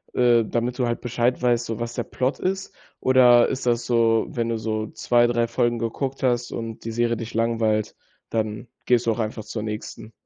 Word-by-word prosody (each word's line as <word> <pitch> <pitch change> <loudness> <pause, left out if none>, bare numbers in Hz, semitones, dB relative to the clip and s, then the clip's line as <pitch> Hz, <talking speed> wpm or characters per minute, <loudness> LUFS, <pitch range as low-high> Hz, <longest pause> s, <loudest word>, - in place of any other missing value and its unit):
äh, 120 -2 +4
damit 120 +3 -2
du 125 - +2
halt 120 - -2
Bescheid 120 +1 0
weißt, 120 -1 +2
so 115 -2 -4
was 120 0 -4
der - - -1
Plot 130 +1 -2
ist. 190 +1 -2 0.3
Oder 125 -2 +6
ist 130 -1 -3
das 120 0 +1
so, 115 -2 +3
wenn 115 -1 -2
du 115 - -1
so 110 0 -2
2, 120 0 +3
3 120 -1 +1
Folgen 120 0 0
geguckt 130 +4 -3
hast 120 -2 +1
und 115 -1 -6
die 115 - -3
Serie 120 +1 +1
dich 115 0 -7
langweilt, 115 -2 0 0.4
dann 110 0 -2 0.2
gehst 125 -1 +3
du - - +4
auch 115 - -3
einfach 110 0 -3
zur 110 - -5
nächsten? 110 +1 -6
120 Hz, 205 wpm, -23 LUFS, 115-120 Hz, 0.4 s, Oder